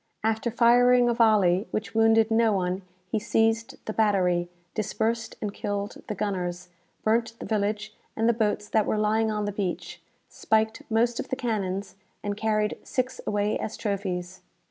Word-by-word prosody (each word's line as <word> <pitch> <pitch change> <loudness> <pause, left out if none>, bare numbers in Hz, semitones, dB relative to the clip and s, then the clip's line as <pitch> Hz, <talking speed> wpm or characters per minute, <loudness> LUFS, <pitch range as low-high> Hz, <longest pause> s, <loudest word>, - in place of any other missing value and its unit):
After 225 +2 0
firing 245 +1 +5
a - - +3
volley, 210 -4 +3
which 215 +1 -4
wounded 225 0 +4
no 225 0 +4
one, 185 0 -1 0.3
he 220 - +1
seized 225 +1 +1
the 215 - -3
battery, 180 -5 +2 0.2
dispersed 225 +1 -1
and 205 -1 -2
killed 205 0 -4
the 210 - -3
gunners, 180 -3 -3 0.3
burnt 230 +1 +1
the - - -7
village 210 0 -1 0.2
and 225 +1 +1
the 235 - +5
boats 210 -2 0
that 215 -1 +1
were - - +1
lying 215 +1 +2
on 210 -1 -1
the 205 - -1
beach, 195 -3 -4 0.3
spiked 220 0 0
most 235 +2 +2
of - - -4
the - - 0
cannons, 200 -6 -3 0.3
and 205 0 -2
carried 215 0 0
six 255 0 -2
away 205 0 0
as 215 - -4
trophies. 185 -3 -3
215 Hz, 165 wpm, -26 LUFS, 200-225 Hz, 0.3 s, firing